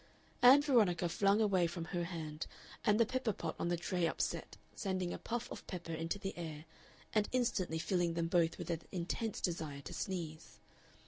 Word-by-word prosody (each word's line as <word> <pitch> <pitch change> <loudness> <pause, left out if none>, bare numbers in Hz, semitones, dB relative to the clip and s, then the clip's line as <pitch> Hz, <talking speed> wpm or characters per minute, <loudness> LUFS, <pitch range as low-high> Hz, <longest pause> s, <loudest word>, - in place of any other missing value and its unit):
Ann 260 +4 +9
Veronica 210 - +4
flung 200 +4 +3
away 190 -5 +3
from 170 0 -4
her 175 0 -2
hand, 160 -3 -5 0.4
and 210 +1 +4
the 230 - +6
pepper 255 -2 0
pot - - -4
on - - 0
the 175 0 +1
tray 175 0 0
upset, 160 - -2 0.2
sending 185 -4 -2
a - - -5
puff 240 0 -3
of - - -8
pepper 170 -3 -5
into 165 +4 -2
the 195 -1 -4
air 160 -3 -6 0.5
and 210 -1 +2
instantly 230 -10 +1
filling 175 0 +1
them 165 0 0
both 170 -1 +2
with - - -4
an 165 -1 -2
intense 190 +5 -2
desire 155 -5 -2
to - - -8
sneeze. 165 -5 -4
175 Hz, 185 wpm, -36 LUFS, 165-205 Hz, 0.5 s, Ann